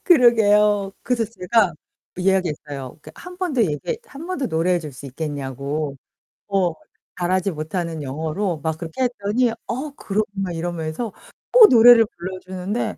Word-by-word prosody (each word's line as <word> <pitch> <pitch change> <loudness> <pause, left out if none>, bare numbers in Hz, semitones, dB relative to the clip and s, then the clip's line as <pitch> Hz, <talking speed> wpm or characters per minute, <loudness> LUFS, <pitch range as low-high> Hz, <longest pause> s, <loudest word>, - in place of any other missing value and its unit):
그러게요. 210 - +4
그래서 240 -2 0
제가 210 -3 +1 0.4
이야기 185 -1 +2
했어요. 140 -3 -7
그러니까 - - -12
1 360 0 -10
번 365 -3 -2
더 245 -4 +3
얘기 150 -7 0 0.3
1 295 +4 -9
번 370 -3 -3
더 265 - -1
노래해 175 +1 +1
줄 150 -3 -8
수 130 +2 -10
있겠냐고. 140 0 -4 0.5
어. 190 -4 +1 0.5
잘하지 185 +2 +1
못하는 165 0 -4
영어로 160 +6 -2
막 160 -1 -1
그렇게 170 +10 -3
했더니 240 0 +1 0.2
"어 270 +5 -3
그럼." 210 -3 -1
막 195 -2 -3
이러면서 170 +5 -4 0.4
또 480 -3 +10
노래를 230 -2 +8
불러주는데 185 +4 -4
185 Hz, 315 characters per minute, -22 LUFS, 160-230 Hz, 0.5 s, 또